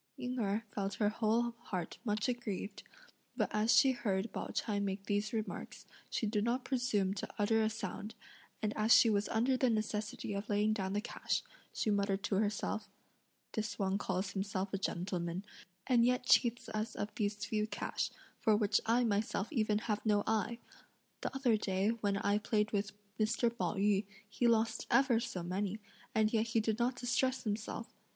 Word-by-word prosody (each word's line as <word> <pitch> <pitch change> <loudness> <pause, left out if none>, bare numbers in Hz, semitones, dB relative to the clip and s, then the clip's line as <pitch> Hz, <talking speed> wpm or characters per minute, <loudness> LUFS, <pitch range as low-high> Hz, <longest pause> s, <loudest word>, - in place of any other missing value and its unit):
Ying 250 -1 -3
Erh 210 0 0
felt 200 -1 -2
her 210 -2 +2
whole 230 +2 +1
heart 180 -3 -4
much 210 -2 0
aggrieved, 235 -5 -3 0.6
but - - +1
as 215 +2 +3
she 270 - +7
heard 210 -4 -1
Pao - - -3
ch'ai 210 -3 -1
make 195 0 -2
these 205 +1 0
remarks, 220 -2 -4 0.2
she - - -1
did 210 -1 +1
not 245 +3 0
presume 230 -7 +1
to 200 - -5
utter 220 +2 +3
a 220 - +2
sound, 215 -1 -5 0.5
and 210 0 0
as 215 +1 +1
she 230 - +6
was 205 0 +1
under 240 +4 +2
the 255 -1 +3
necessity 215 -1 -2
of 200 +1 -4
laying 210 +1 +3
down 195 -2 -2
the 205 - 0
cash, - - -2 0.3
she 215 - 0
muttered 200 -1 +1
to 200 - +1
herself: 210 0 -1 0.6
"This 215 -2 -3
one 195 0 0
calls 190 -1 -1
himself 195 0 -2
a 195 - 0
gentleman, 180 0 -2 0.4
and 245 -3 +4
yet 250 +1 +2
cheats 240 0 +4
us 220 +1 -3
of 205 +1 -3
these 205 -1 -1
few 215 -1 0
cash, - - -2 0.3
for 215 -2 +4
which 210 -2 +2
I 235 +2 +4
myself 210 0 0
even 215 -5 +2
have 215 -1 -2
no 210 -2 +3
eye! 220 +1 0 0.6
The - - -3
other 250 -5 +3
day 195 0 0
when 210 -3 0
I 205 +1 +2
played 210 0 +1
with 205 0 -1 0.3
Mr. 230 +2 +1
Pao 235 - -1
yü, 200 0 +2 0.2
he 235 +3 +1
lost 225 -1 +2
ever 265 -4 +4
so 185 -6 -4
many, 190 +3 -2 0.4
and 220 0 +3
yet 225 0 +2
he 230 0 +2
did 220 +1 0
not 245 +1 +1
distress 250 +1 0
himself! 215 +1 -3
215 Hz, 180 wpm, -34 LUFS, 200-230 Hz, 0.6 s, she